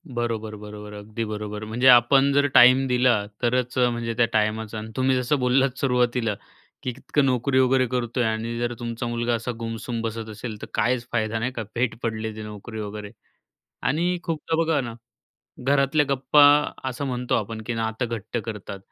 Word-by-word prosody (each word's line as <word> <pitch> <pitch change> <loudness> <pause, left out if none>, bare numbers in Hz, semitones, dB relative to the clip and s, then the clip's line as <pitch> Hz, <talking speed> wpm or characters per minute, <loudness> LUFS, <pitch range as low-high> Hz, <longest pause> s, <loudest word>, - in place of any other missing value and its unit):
बरोबर. 110 -2 -2
बरोबर. 105 0 -9
अगदी 105 +2 -5
बरोबर. 105 0 -5
म्हणजे 120 +4 +1
आपण 135 +3 +6
जर 145 0 +4
टाईम 125 +2 +7
दिला 125 -4 +2 0.2
तरच 125 +1 0
म्हणजे 120 -2 +1
त्या 120 - +5
टायमाचा 110 0 0
आणि 110 +1 -7
तुम्ही 130 0 +2
जसं 125 +3 0
बोललात 130 +1 +2
सुरुवातीला, 125 -4 +1 0.5
की - - -2
इतकं 135 +3 0
नोकरी 130 +1 +2
वगैरे 130 0 +4
करतोय 125 0 -1
आणि 115 +1 -2
जर 120 0 -1
तुमचा 120 +1 -4
मुलगा 120 0 -1
असा 115 +2 -3
गुमसुम 115 +1 -4
बसत 115 -1 -4
असेल, 110 0 -7
तर - - -6
काहीच 120 +1 +1
फायदा 110 -1 0
नाही 120 +3 -1
का 120 -3 -5
भेट 120 0 0
पडले 110 -1 -2
ते 110 - -7
नोकरी 105 +1 -8
वगैरे. 105 0 -6 0.7
आणि 165 +8 +1
खूपदा 160 -1 -2
बघा 160 -2 +1
ना, 120 -2 -6 0.7
घरातल्या 140 +2 +3
गप्पा 140 +2 +4 0.5
असं 130 +2 -4
म्हणतो 125 -1 -2
आपण 110 0 -2
की 120 - -2
नातं 115 +2 -2
घट्ट 115 -4 -5
कतात. 105 -3 -6
120 Hz, 170 wpm, -24 LUFS, 110-130 Hz, 0.7 s, टाईम